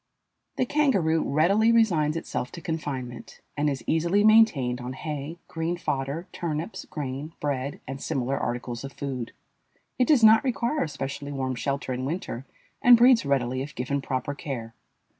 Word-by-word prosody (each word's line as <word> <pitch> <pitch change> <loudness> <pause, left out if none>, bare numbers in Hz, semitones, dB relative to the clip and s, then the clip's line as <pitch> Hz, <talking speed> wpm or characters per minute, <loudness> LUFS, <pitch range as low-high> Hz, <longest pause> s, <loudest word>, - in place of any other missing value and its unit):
The 255 - +1
kangaroo 200 - +2
readily 195 +10 +3
resigns 170 -10 +3
itself 125 -6 -4
to 170 - -7
confinement, 135 -7 -5 0.2
and 150 0 +1
is 135 -4 -3
easily 170 +6 +2
maintained 165 - +4
on 125 +1 -5
hay, 150 +2 -5
green 165 +2 -2
fodder, 140 +2 -3
turnips, 165 +3 -4
grain, 145 +1 -5
bread, 140 -1 -2
and 135 +1 -6
similar 130 +1 -1
articles 120 0 -3
of 135 - -7
food. 130 -5 -4 0.7
It 250 - +4
does 280 -7 +4
not 220 0 +8
require 260 +3 0
a - - -6
specially 140 0 -5
warm 130 -2 -2
shelter 135 +1 -2
in 125 +1 -3
winter 135 -5 -4 0.3
and 245 -1 +8
breeds 240 - +6
readily 130 -2 0
if 145 +2 -7
given 140 +3 -2
proper 130 +1 -2
care. 130 -6 -6
145 Hz, 160 wpm, -26 LUFS, 130-175 Hz, 0.7 s, not